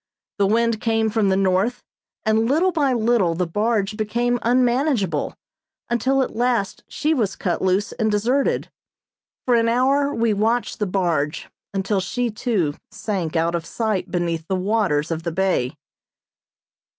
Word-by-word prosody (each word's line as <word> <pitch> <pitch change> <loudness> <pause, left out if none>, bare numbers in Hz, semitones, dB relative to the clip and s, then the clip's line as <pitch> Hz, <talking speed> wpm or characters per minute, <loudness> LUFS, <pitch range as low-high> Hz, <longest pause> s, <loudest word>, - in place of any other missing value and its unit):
The 200 - +4
wind 230 +1 +1
came 225 -1 +1
from 210 -3 +2
the 190 - +2
north, 195 +6 +1 0.4
and 220 +1 +2
little 340 +7 +3
by 295 -5 +1
little 225 -7 +2
the 180 +2 0
barge 210 +3 0
became 240 +3 0
unmanageable, 240 - +1 0.6
until 265 +3 +2
at - - -6
last 235 -4 0
she 310 +2 0
was 215 -9 0
cut 175 -3 -2
loose 190 +2 +1
and 220 - 0
deserted. 240 +7 0 0.7
For 250 - +2
an 230 -1 +3
hour 275 +4 +2
we 230 -3 +1
watched 225 +4 0
the 210 - 0
barge, 170 -5 -1 0.2
until, 195 +1 0
she 240 +5 -2
too, 210 - 0 0.2
sank 180 -7 -3
out 165 +1 +1
of 170 -1 -1
sight 200 -1 -2
beneath 170 -2 -2
the 190 - 0
waters 185 -6 0
of 165 0 -2
the 170 0 -3
bay. 185 -8 0
215 Hz, 150 wpm, -22 LUFS, 185-240 Hz, 0.7 s, The